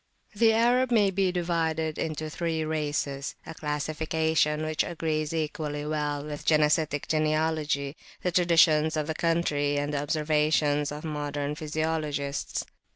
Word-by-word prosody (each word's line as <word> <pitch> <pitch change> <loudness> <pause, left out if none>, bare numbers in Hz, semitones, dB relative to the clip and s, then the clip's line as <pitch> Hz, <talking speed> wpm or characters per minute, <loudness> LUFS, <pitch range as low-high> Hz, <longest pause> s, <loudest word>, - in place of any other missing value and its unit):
THE 225 +2 +4
Arab 240 +3 +3
may 205 -4 +4
be 190 -1 +1
divided 165 -3 -1
into 155 0 -3
three 165 0 -2
racesa 150 -3 -2 0.2
classification 155 +1 0
which 155 0 0
agrees 155 -2 -2
equally 150 -2 -3
well 150 -1 -2
with 150 -1 -6
genesitic 150 -1 +2
genealogy, 155 -2 0 0.3
the 180 - +1
traditions 165 -3 +4
of 155 - 0
the 160 - -2
country, 150 -4 +1
and 145 +1 -1
the 140 - 0
observations 150 -1 +1
of 150 +1 -6
modern 145 -2 -3
physiologists. 150 -2 -2
155 Hz, 125 wpm, -27 LUFS, 150-160 Hz, 0.3 s, THE